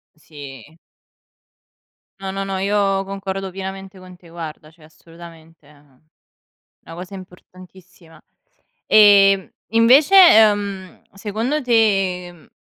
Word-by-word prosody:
Sì. 145 -1 -14 1.4
No, 195 0 -6
no, 195 0 -5
no, 195 -1 -5
io 195 -1 -1
concordo 195 -1 -6
pienamente 190 0 -9
con 185 -1 -15
te, 170 -2 -20
guarda, 155 -2 -10
cioè 160 -1 -24
assolutamente, 165 -1 -17
ehm, 145 -3 -25 0.8
una 165 - -12
cosa 180 +2 -10
importantissima. 185 -2 -17 0.7
Ehm, 195 -2 +4 0.2
invece, 255 - +3
ehm, 205 - +3
secondo 225 +9 -4
te, 195 -7 0
ehm, 175 -2 -18
190 Hz, 105 wpm, -18 LUFS, 165-200 Hz, 1.4 s, Ehm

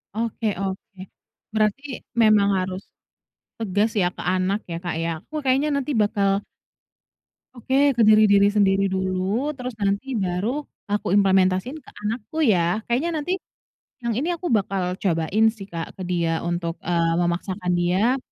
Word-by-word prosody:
Oke 230 0 -3 0.2
oke, 195 0 -5 0.6
berarti 215 +5 +1 0.4
memang 210 -2 +5
harus, 185 +1 -3 0.8
tegas 210 0 +1
ya 175 - +3
ke - - -15
anak 185 +3 0
ya - - -2
Kak 175 - -3
ya 165 - -1
aku 310 - -12
kayaknya 270 +3 +2
nanti 280 +1 -1
bakal 205 -1 +1 1.3
Oke 260 +3 -2 0.2
ke - - +4
diri 205 -2 +6
sendiri 195 -1 +3
dulu 190 +8 -1
terus 250 -1 -5
nanti 200 +5 0 0.2
baru 180 +5 -1 0.4
aku 205 - -1
implementasiin 190 +6 +2
ke - - -15 0.2
anakku 225 +7 -4 0.2
ya 175 +5 +1
kayaknya 260 +8 0
nanti, 315 +5 -3 0.7
yang 235 - 0
ini 310 +6 -1
aku 350 - -6
bakal 195 -3 +1 0.2
cobain 185 +4 +1
sih 195 - -8
Kak 165 -1 -5
ke 190 - -6
dia 170 -2 +1
untuk, 170 -1 -2
eee, 170 -1 +1
memaksakan 180 +1 -1
dia, 195 +9 +2
200 Hz, 145 wpm, -23 LUFS, 185-225 Hz, 1.3 s, diri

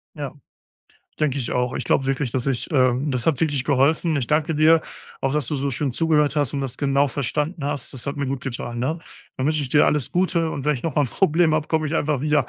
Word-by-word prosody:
Ja. 145 -3 -5 0.9
Denke 145 -3 +1
ich 120 - -3
auch. 125 0 0
Ich - - -3
glaub 135 - +1
wirklich, 135 -2 -1
dass 130 0 -1
ich, 130 +2 -2
ähm 130 +1 +2
das 125 +1 -1
hat 150 -6 +2
wirklich 145 -5 0
geholfen. 150 +3 +2
Ich 130 - -1
danke 155 +1 +1
dir. 160 +2 +5 0.4
Auch, 135 0 0
dass 150 -5 0
du 150 - -2
so 140 +1 -1
schön 135 +1 -1
zugehört 150 -1 +2
hast 145 -3 0
und 140 - -1
das 130 -2 -4
genau 140 0 +2
verstanden 150 +5 -2
hast. 140 -3 -3
Das 130 0 -5
hat 140 +2 -3
mir 140 -1 -2
gut 135 -1 -3
getan, 120 -3 -5
ne? 155 +7 -1 0.4
Dann 130 - -1
wünsch 155 -1 +1
ich 135 - -3
dir 145 - +4
alles 150 -5 0
Gute 175 -3 +1
und 140 -1 -5
wenn 150 0 +2
ich 120 - -7
noch 160 -5 -2
mal 145 - +3
'n - - -4
Problem 165 -3 +3
habe, 155 -1 -1
komm 160 -1 +1
ich 155 +2 -2
einfach 150 -4 0
wieder. 150 -3 +2
145 Hz, 255 wpm, -22 LUFS, 130-155 Hz, 0.9 s, dir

